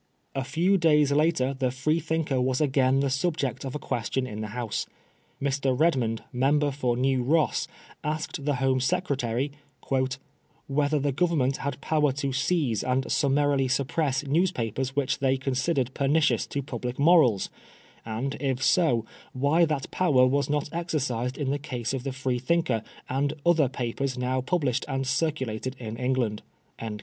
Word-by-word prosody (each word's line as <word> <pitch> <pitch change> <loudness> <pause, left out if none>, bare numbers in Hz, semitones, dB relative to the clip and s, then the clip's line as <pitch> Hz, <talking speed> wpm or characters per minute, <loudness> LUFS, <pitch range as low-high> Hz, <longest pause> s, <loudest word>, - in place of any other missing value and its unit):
A 135 - -2
few 170 +9 +2
days 150 -3 +4
later 145 -3 +2
the 130 -1 0
Freethinker 155 +1 0
was 130 0 +1
again 135 -2 +3
the 140 - +1
subject 140 -1 -1
of 135 0 -5
a - - 0
question 125 -1 -2
in 110 -4 -6
the 110 - -3
House. 115 -4 -2 0.5
Mr. 135 -2 0
Redmond, 130 -9 +1
member 145 +3 +2
for 125 -3 -1
New 130 0 +2
Ross, 155 +5 +1 0.4
asked 150 -1 -3
the 145 0 +1
Home 130 0 +1
Secretary 135 -4 0 1.1
"whether 145 +2 +1
the 140 0 0
Government 140 -3 +1
had 140 -1 -4
power 150 -3 +2
to 140 -1 -2
seize 140 - +1
and 130 +1 0
summarily 140 -1 +2
suppress 135 +1 0
newspapers 135 - 0
which 140 -1 0
they 135 -1 +2
considered 130 0 -1
pernicions 145 +3 +2
to 140 - -3
public 125 -3 -5
morals; 140 - +4 0.5
and, 115 +5 -3
if 130 -2 -1
so, 125 -11 +3 0.3
why 145 +6 +3
that 150 -4 -3
power 145 -9 +4
was 140 +3 +1
not 150 -1 0
exercised 135 -7 -2
in 140 -3 -1
the 145 - -1
case 125 -4 -4
of 130 -2 -3
the 135 - -2
Freethinker 130 0 0 0.3
and 140 +3 0
other 160 -6 +4
papers 130 +1 -3
now 130 +1 0
published 135 -3 0
and 135 -1 -2
circulated 130 -3 -1
in 110 -3 -6
England." 125 -4 0
135 Hz, 150 wpm, -27 LUFS, 130-150 Hz, 1.1 s, days